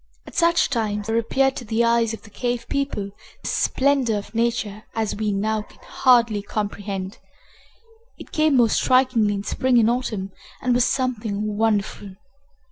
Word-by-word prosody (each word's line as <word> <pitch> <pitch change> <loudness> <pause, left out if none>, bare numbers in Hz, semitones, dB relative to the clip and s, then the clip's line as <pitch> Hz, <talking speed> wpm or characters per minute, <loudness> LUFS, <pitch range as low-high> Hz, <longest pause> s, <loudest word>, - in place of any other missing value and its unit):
At - - -12
such 340 -2 +3
times 210 -4 -1
there 225 +1 0
appeared 270 +4 +1
to - - -5
the 225 +1 0
eyes 230 -1 +2
of 225 - -7
the 210 - -15
cave 240 +1 -2
people 275 -8 -2 0.3
the - - -5
splendor 265 -4 +1
of 205 - -8
nature 230 -3 -1
such - - -2
as 220 -2 -1
we 215 0 -1
now 215 +2 0
can - - -17
hardly 235 -5 +3
comprehend. 200 -1 -4 1.0
It - - -12
came 310 -3 +3
most 235 -3 +4
strikingly 255 -5 +3
in 200 - -4
spring 255 +3 +1
and 230 0 +4
autumn, 215 -6 -3 0.3
and 250 -1 +1
was 245 0 +3
something 215 -5 -1
wonderful. 205 -2 -1
225 Hz, 165 wpm, -23 LUFS, 210-250 Hz, 1.0 s, most